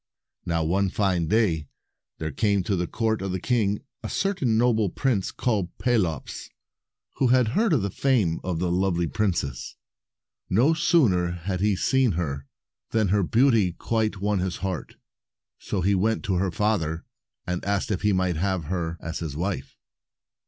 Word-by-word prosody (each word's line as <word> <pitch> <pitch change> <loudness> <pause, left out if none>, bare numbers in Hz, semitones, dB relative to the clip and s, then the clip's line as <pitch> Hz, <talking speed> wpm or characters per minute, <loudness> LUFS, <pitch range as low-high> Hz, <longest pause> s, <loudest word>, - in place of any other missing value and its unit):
Now, 85 -1 +1
one 95 +5 +1
fine 90 -4 0
day, 85 -7 +1 0.5
there 80 0 -4
came 100 -4 +1
to 100 +2 0
the 90 -1 -1
court 110 -2 -1
of 95 -1 -3
the 95 - -2
king 105 -2 0 0.2
a - - -5
certain 145 - 0
noble 110 -4 +3
prince 110 -4 0
called 105 -8 -2
Pelops, 95 - -1 0.7
who 135 - +3
had 125 -2 +4
heard 215 - +2
of 135 -10 +2
the 100 - -2
fame 110 -12 +1
of 90 -3 -2
the 85 +1 -1
lovely 90 -1 +1
princess. 80 - -2 0.4
* - - -59
No 145 +7 +5
sooner 120 - +3
had 90 +2 -4
he 105 -1 +2
seen 130 +2 +2
her, 70 -5 -3 0.4
than 110 -4 +1
her 100 +1 +3
beauty 110 -2 +3
quite 110 0 -1
won 105 0 0
his 90 -1 -2
heart. 95 -3 -4 0.6
So 100 - -3
he 100 +3 +2
went 110 +4 +1
to 95 - -1
her 95 +1 +1
father, 90 -6 -1 0.4
and 90 0 -3
asked 100 +2 -1
if 95 - -1
he 105 - +2
might 95 -3 +1
have 95 0 0
her 85 0 -3
as 85 -1 -4
his 75 -4 -5
wife. 85 -6 -3
95 Hz, 170 wpm, -25 LUFS, 85-110 Hz, 0.7 s, No